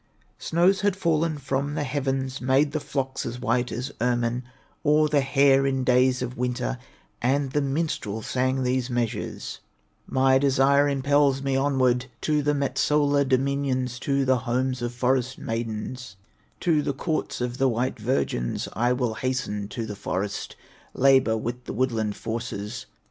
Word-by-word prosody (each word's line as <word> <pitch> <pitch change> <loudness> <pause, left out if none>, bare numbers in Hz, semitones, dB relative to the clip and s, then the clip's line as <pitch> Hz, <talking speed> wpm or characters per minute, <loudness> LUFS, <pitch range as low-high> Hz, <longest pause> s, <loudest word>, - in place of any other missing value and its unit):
Snows 180 +4 +2
had 200 -2 +2
fallen 165 -3 +1
from 140 +1 -2
the 150 - -1
heavens, 135 -1 -2
Made 135 +3 +3
the 155 - -1
flocks 135 -2 -3
as 120 +1 -5
white 125 0 0
as 130 +4 -4
ermine 120 0 +1 0.4
Or 150 0 +4
the 150 -1 +2
hare, 135 0 +4
in 135 -1 0
days 125 0 +3
of 125 0 -5
winter, 125 0 -2 0.4
And 135 +2 +1
the 145 - +1
minstrel 135 -7 -2
sang 130 +2 0
these 125 0 0
measures: 120 -2 -3 0.5
"My 130 0 +3
desire 140 +1 +4
impels 140 0 +2
me 135 -1 0
onward 130 -2 +2
To 150 -1 +1
the 145 +1 +1
Metsola 145 +1 +2
dominions, 130 -2 0
To 140 0 0
the 130 0 +3
homes 125 +1 -1
of 120 0 -2
forest 125 +1 0
maidens, 115 0 -4 0.5
To 160 -4 +3
the 140 - -1
courts 155 +3 -2
of 125 +1 -3
the 135 0 +4
white 120 +1 -1
virgins; 110 - -1
I 120 +2 +2
will 125 -3 -1
hasten 110 -4 -2
to 115 +2 -5
the 105 -2 -6
forest, 100 +1 -3 0.4
Labor 130 -4 +4
with 120 +2 -5
the - - -5
woodland 110 -4 0
forces. 115 -3 -5
130 Hz, 155 wpm, -25 LUFS, 120-140 Hz, 0.5 s, Or